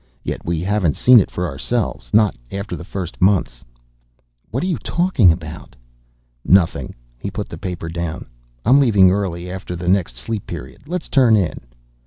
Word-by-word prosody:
Yet - - -4
we 85 -1 -2
haven't 95 -4 +1
seen 125 -1 +7
it 95 - 0
for 90 - -3
ourselves, 100 - -3
not 105 -5 +4 0.2
after 100 -2 -4
the 80 - -8
first 90 -1 -6
months 95 -1 +2 0.4
..." - - -43
"What 130 +8 -2
are - - 0
you 175 -9 -1
talking 160 - +3
about?" 80 -4 -7 0.7
"Nothing." 95 -3 +2 0.2
He - - -4
put - - -5
the - - -8
paper 90 -3 -5
down. 85 -1 -4 0.4
"I'm 130 +5 +6
leaving 100 -9 +5
early 90 -3 -2
after 95 -1 -6
the 85 0 -6
next 90 -9 +1
Sleep 105 - -4
Period. 65 - -9
Let's 180 +1 -3
turn 125 -6 +4
in." 95 -6 0
95 Hz, 175 wpm, -20 LUFS, 85-110 Hz, 0.7 s, seen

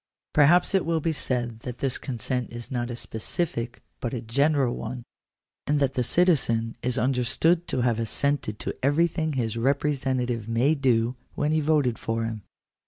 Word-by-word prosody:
Perhaps 165 +6 +5
it 190 - +3
will 165 0 0
be 165 +1 0
said 120 -5 -2
that 125 +1 -7
this 135 -2 -1
consent 125 -1 -3
is 120 +2 -8
not 120 -1 -2
a 120 - -4
specific, 120 - -3 0.2
but 120 +1 -3
a 120 - -3
general 135 +2 +2
one, 120 +2 -5 0.6
and 145 0 +2
that 135 -2 +1
the 125 - 0
citizen 120 -8 +2
is 125 0 0
understood 130 +8 +2
to 130 - -1
have 120 -2 +1
assented 115 -1 -1
to - - -4
everything 160 +3 +1
his 115 -4 -1
repre 140 +4 +1
sentative 125 -4 -2
may 120 +6 +3
do, 125 -4 +1 0.2
when 150 +1 0
he 155 - +3
voted 145 -6 +2
for 115 0 -2
him. 110 -2 -4
125 Hz, 170 wpm, -26 LUFS, 115-145 Hz, 0.6 s, Perhaps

